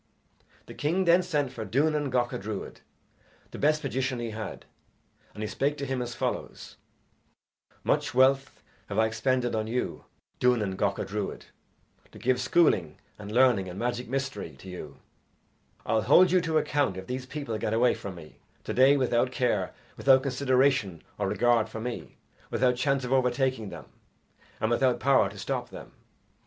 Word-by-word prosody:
The -, -, -10 dB
king 175 Hz, +6 st, 0 dB
then 175 Hz, +1 st, +5 dB
sent 150 Hz, -7 st, -1 dB
for 115 Hz, -, -5 dB
Duanan 145 Hz, +6 st, +1 dB
Gacha 125 Hz, -4 st, -1 dB
Druid, 105 Hz, 0 st, -6 dB, 0.7 s
the -, -, -8 dB
best 155 Hz, +1 st, +2 dB
magician 130 Hz, -1 st, -1 dB
he 120 Hz, -1 st, -4 dB
had, 110 Hz, 0 st, -7 dB, 0.7 s
and 105 Hz, -, -5 dB
he -, -, -2 dB
spake 145 Hz, +6 st, -1 dB
to 140 Hz, -, -3 dB
him 130 Hz, -1 st, -2 dB
as 120 Hz, -1 st, -5 dB
follows: -, -, -4 dB, 1.1 s
"Much -, -, 0 dB
wealth 135 Hz, +1 st, +3 dB, 0.3 s
have 100 Hz, -, -4 dB
I 110 Hz, -, +4 dB
expended 120 Hz, +3 st, 0 dB
on 110 Hz, -1 st, -1 dB
you, 125 Hz, +3 st, -3 dB, 0.3 s
Duanan 115 Hz, -6 st, +2 dB
Gacha 100 Hz, 0 st, -1 dB
Druid, 105 Hz, 0 st, -4 dB, 0.7 s
to -, -, -13 dB
give 125 Hz, 0 st, +1 dB
schooling 125 Hz, -, +2 dB, 0.2 s
and 105 Hz, 0 st, -8 dB
learning 120 Hz, -6 st, +3 dB
and 90 Hz, -, -8 dB
magic 120 Hz, +2 st, -2 dB
mystery 120 Hz, -, -3 dB
to 95 Hz, -, -13 dB
you, 75 Hz, -6 st, -8 dB, 0.9 s
I'll 110 Hz, -, +2 dB
hold 180 Hz, -, +6 dB
you 185 Hz, -1 st, +4 dB
to 160 Hz, -2 st, 0 dB
account 145 Hz, -10 st, +1 dB
if 95 Hz, -, -7 dB
these 130 Hz, +2 st, -5 dB
people 135 Hz, -7 st, -4 dB
get 105 Hz, -, -2 dB
away 120 Hz, +2 st, +4 dB
from 100 Hz, -2 st, -7 dB
me 80 Hz, -3 st, -13 dB, 0.3 s
to -, -, -4 dB
day 135 Hz, +3 st, +5 dB
without 125 Hz, -1 st, +1 dB
care, 105 Hz, -7 st, 0 dB, 0.3 s
without 130 Hz, -1 st, +5 dB
consideration 130 Hz, -, +1 dB, 0.2 s
or -, -, 0 dB
regard 120 Hz, -2 st, +2 dB
for 110 Hz, -, -6 dB
me, 120 Hz, +1 st, -6 dB, 0.3 s
without 125 Hz, -1 st, +2 dB
chance 135 Hz, +1 st, 0 dB
of 125 Hz, -, -1 dB
overtaking 130 Hz, -3 st, +1 dB
them, -, -, -9 dB, 0.7 s
and 110 Hz, -, 0 dB
without 125 Hz, +1 st, +2 dB
power 135 Hz, +2 st, +3 dB
to -, -, -12 dB
stop -, -, -3 dB
them." -, -, -10 dB
125 Hz, 165 wpm, -28 LUFS, 110-135 Hz, 1.1 s, hold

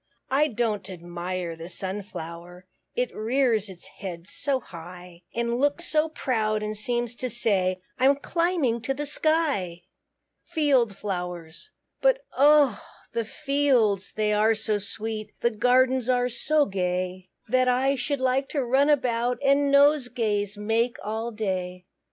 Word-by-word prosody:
I 290 Hz, +3 st, +4 dB
don't 220 Hz, -6 st, -2 dB
admire 175 Hz, 0 st, -5 dB
the 165 Hz, +1 st, -9 dB
Sunflower, 180 Hz, -2 st, -7 dB, 0.3 s
It 250 Hz, -1 st, -1 dB
rears 225 Hz, -2 st, +1 dB
its 185 Hz, -2 st, -12 dB
head 175 Hz, -3 st, -8 dB
so 275 Hz, +3 st, -1 dB
high; 175 Hz, -3 st, -11 dB
And 235 Hz, +1 st, 0 dB
looks 290 Hz, +5 st, +1 dB
so 310 Hz, 0 st, +1 dB
proud, 215 Hz, -8 st, -1 dB
and 215 Hz, 0 st, -3 dB
seems 240 Hz, +2 st, -1 dB
to 255 Hz, -, -2 dB
say, 195 Hz, -5 st, +1 dB, 0.2 s
"I'm 270 Hz, +2 st, +5 dB
climbing 315 Hz, -5 st, 0 dB
to 270 Hz, +4 st, -2 dB
the 295 Hz, +2 st, -3 dB
sky." 285 Hz, -, 0 dB, 0.6 s
FIELD 275 Hz, -, +2 dB
FLOWERS. 180 Hz, -, -5 dB, 0.3 s
But -, -, +3 dB
oh! 285 Hz, -5 st, +5 dB, 0.3 s
the 230 Hz, -1 st, -1 dB
fields 260 Hz, -7 st, +1 dB
they 215 Hz, -1 st, +1 dB
are 215 Hz, +2 st, +3 dB
so 215 Hz, -1 st, -1 dB
sweet, 215 Hz, +1 st, -5 dB
The 235 Hz, -, +2 dB
gardens 250 Hz, +2 st, +3 dB
are 250 Hz, 0 st, +2 dB
so 295 Hz, +5 st, +2 dB
gay, 185 Hz, -1 st, -2 dB, 0.2 s
That 255 Hz, +2 st, +2 dB
I 260 Hz, +2 st, +2 dB
should 270 Hz, +2 st, -2 dB
like 260 Hz, +1 st, +1 dB
to 280 Hz, -4 st, -1 dB
run 270 Hz, +4 st, +3 dB
about, 245 Hz, -4 st, +1 dB
And 280 Hz, +1 st, +4 dB
nosegays 245 Hz, -8 st, +2 dB
make 230 Hz, +4 st, 0 dB
all 220 Hz, +2 st, -3 dB
day. 185 Hz, -4 st, -3 dB
230 Hz, 140 wpm, -26 LUFS, 195-270 Hz, 0.6 s, I'm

